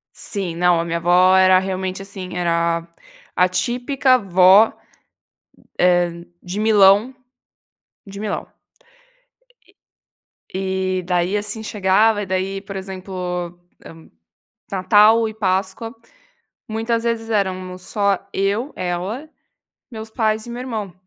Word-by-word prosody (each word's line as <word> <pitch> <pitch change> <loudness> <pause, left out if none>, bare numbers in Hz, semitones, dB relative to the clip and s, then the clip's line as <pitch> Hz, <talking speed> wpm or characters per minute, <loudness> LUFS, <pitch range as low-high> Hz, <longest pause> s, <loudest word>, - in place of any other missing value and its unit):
Sim, 185 -5 -5
não, 175 -1 +3
a - - -2
minha 170 0 -2
vó 180 +2 +4
era 185 0 +6
realmente, 190 0 -3
assim, 190 -2 -8
era 170 -1 0 0.5
a 180 0 +4
típica 250 +6 +1
vó, 190 +2 +5 1.1
eh, 175 -1 +4 0.4
de 185 +3 -5
Milão 215 +3 +4 0.9
de 200 0 -10
Milão. 215 -1 -4 2.1
E 190 -1 -2
e-e 180 - -1
aí 180 +4 +1
assim 210 +2 -5
chegava, 205 +1 +2
e - - -5
daí 190 +1 -2
por 195 0 -9
exemplo, 190 0 -7
hã, 180 -1 -4 1.2
Natal 215 +4 +4
e 215 - -9
Páscoa 195 +3 -2 0.8
muitas 225 +1 -1
vezes 230 -1 -2
éramos 185 -3 -2
só 200 -1 0
eu 205 +8 -1
ela, 185 - -4 0.6
meus 220 -1 -8
pais 220 -1 -1
e - - -10
meu 240 +1 -6
irmão. 220 -7 -5
195 Hz, 115 wpm, -20 LUFS, 185-220 Hz, 2.1 s, era